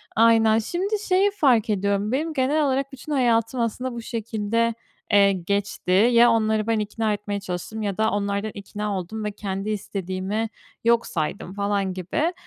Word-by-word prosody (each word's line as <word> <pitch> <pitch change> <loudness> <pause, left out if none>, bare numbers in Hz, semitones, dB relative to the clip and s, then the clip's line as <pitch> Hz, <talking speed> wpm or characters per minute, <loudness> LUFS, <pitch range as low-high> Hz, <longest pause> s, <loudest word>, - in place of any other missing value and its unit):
Aynen. 225 -1 +5
Şimdi 360 - -2 0.2
şeyi 385 +2 +4
fark 260 - +3
ediyorum, 200 +1 0
benim 310 +5 -1
genel 290 +2 +2
olarak 275 0 0
bütün 270 +3 -9
hayatım, 235 -2 +2
aslında, 245 +3 -2
bu 235 - -5
şekilde, 230 0 -1 0.4
eee, 200 -1 +6
geçti. 195 +1 -2
Ya 235 +5 +6
onları 220 -1 +1
ben 225 -1 +2
ikna 215 +1 -1
etmeye 205 0 -3
çalıştım 195 +3 -5
ya 200 -3 -2
da 220 0 +2
onlardan 200 +1 -1
ikna 205 0 -4
oldum 215 +5 -6
ve 210 - -2
kendi 200 0 -4
istediğimi 200 +1 -3 0.3
yok 235 0 +3
saydım 175 +3 -3
falan 200 -1 -1
gibi. 190 - -1
215 Hz, 160 wpm, -24 LUFS, 200-235 Hz, 0.4 s, eee